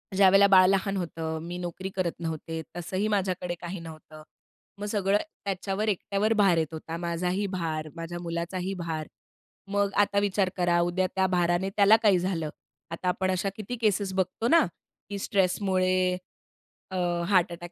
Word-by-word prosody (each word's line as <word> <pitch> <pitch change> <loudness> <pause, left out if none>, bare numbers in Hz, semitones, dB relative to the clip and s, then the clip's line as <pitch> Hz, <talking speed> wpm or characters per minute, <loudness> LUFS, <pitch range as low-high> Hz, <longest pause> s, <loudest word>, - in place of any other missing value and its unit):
ज्यावेळेला 195 +1 +6
बाळ 185 -2 +7
लहान 195 0 +1
होतं, 160 -2 -3
मी 175 +1 -5
नोकरी 180 +2 -5
करत 180 -3 0
नव्हते, 160 -1 -4 0.2
तसंही 185 +4 -2
माझ्याकडे 185 -3 -1
काही 175 +1 -5
नव्हतं. 155 -1 -11 0.6
मग 205 - -4
सगळं 205 -1 +2 0.3
त्याच्यावर, 195 +2 -2
एकट्यावर 205 +2 0
भार 195 -4 +4
येत 160 0 -1
होता. 160 +1 -5
माझाही 180 +3 -1
भार, 160 -4 -3
माझ्या 170 +1 -6
मुलाचाही 175 +3 -3
भार. 160 -2 -3 0.6
मग 200 0 +1
आता 200 0 +1
विचार 200 -2 +1
करा, 175 -1 +2
उद्या 175 +2 +1
त्या 190 0 +3
भाराने 175 +1 +1
त्याला 205 +1 +7
काही 200 -4 +5
झालं? 175 -4 -2 0.4
आता 170 +2 -4
आपण 185 +1 +1
अशा 185 +2 0
किती 215 +3 -5
केसेस 200 -2 +1
बघतो 190 +4 -1
ना, 330 +5 +5 0.4
की 200 - -4
स्ट्रेसमुळे 185 -2 +1 0.9
अ, 190 - -3 0.3
हार्ट 185 -3 +4
अटॅक 175 0 -8
185 Hz, 155 wpm, -27 LUFS, 170-195 Hz, 0.9 s, बाळ